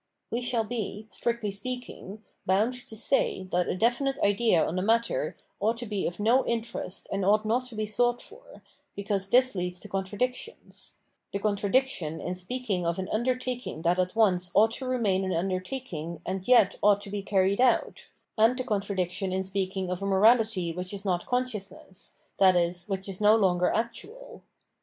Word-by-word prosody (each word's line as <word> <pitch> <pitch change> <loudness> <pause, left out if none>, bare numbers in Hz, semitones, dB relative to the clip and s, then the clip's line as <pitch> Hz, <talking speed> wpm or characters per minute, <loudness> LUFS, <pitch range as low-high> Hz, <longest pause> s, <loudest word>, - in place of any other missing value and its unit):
We 235 - -1
shall 240 -2 0
be, 220 -2 -4
strictly 235 -3 -2
spealdng, 215 -1 -7 0.3
bound 205 +6 +3
to 220 - -8
say 215 -4 0
that 180 0 +1
a - - -1
definite 245 +6 +1
idea 205 -4 +3
on 165 - -3
the 185 - 0
matter 230 - +1 0.2
ought 225 +3 +1
to 240 - -4
be 205 -3 -2
of 175 - -6
no 235 +5 +4
interest 230 -5 -3
and 195 0 -1
ought 210 +3 +3
not 245 +4 0
to 245 - -10
be 215 0 -1
sought 240 +3 +1
for, - - -15 0.3
because 200 -1 -2
this 255 +3 +4
leads 180 -1 -3
to - - -9
contradictions 210 - -4 0.2
— - - -51
the - - -1
contradiction 200 - 0
in 180 - -3
speak 250 +8 -5
ing 185 -4 0
of 170 0 -1
an 190 0 -4
undertaking 250 -5 -2
that 175 +1 +2
at 180 +1 0
once 185 -5 +3
ought 220 +2 +6
to 260 +3 -5
remain 210 -7 +1
an 185 -1 -1
undert 185 +3 -2
akin 170 - -5
g - - -16
and 185 0 -4
yet 235 -6 +5
ought 205 -1 +4
to 200 - -9
be 205 0 -2
carried 195 +2 +2
out, 255 -1 +1 0.3
and 230 +3 +5
the 255 - -1
contradiction 195 -4 -2
in 190 +1 0
speaking 190 -1 -2
of 180 +1 -3
a - - -2
morahty 200 -3 +3
which 180 +2 -4
is 200 +1 -8
not 180 -2 -1
consciousness, 210 -6 -4 0.2
i.e. 180 -3 +5
which 195 -1 -3
is 195 0 -7
no 210 +1 +6
longer 180 -4 +2
actual. 425 - -4
205 Hz, 185 wpm, -28 LUFS, 185-235 Hz, 0.3 s, ought